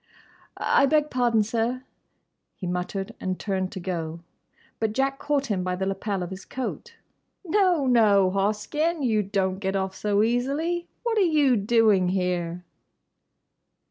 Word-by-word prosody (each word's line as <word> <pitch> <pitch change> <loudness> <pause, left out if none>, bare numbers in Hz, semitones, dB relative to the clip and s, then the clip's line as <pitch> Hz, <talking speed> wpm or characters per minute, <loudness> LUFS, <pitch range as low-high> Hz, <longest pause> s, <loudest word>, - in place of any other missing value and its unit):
"I 275 - +3
beg 300 +1 +2
pardon, 240 -3 +2
sir," 230 +4 -1 0.7
he 185 - -7
muttered, 180 +2 -3
and 185 -1 -3
turned 190 -2 -2
to - - -5
go. 170 -2 -4 0.6
But 220 -1 0
Jack 270 +2 0
caught 290 -2 0
him 200 -7 -1
by 180 0 -1
the 190 +1 -2
lapel 195 0 -2
of 175 - -6
his 190 +1 -7
coat. 460 - -6 0.5
"No, 360 -5 +2
no, 210 -6 +4
Hoskyn; 215 - 0
you 220 -4 +2
don't 190 -2 -1
get 190 -1 -2
off 190 -1 -1
so 205 +1 +1
easily. 285 +9 0 0.2
What 460 -2 +1
are - - +4
you 300 -8 +4
doing 210 -3 +3
here?" 180 -2 -1
210 Hz, 145 wpm, -25 LUFS, 190-270 Hz, 0.7 s, no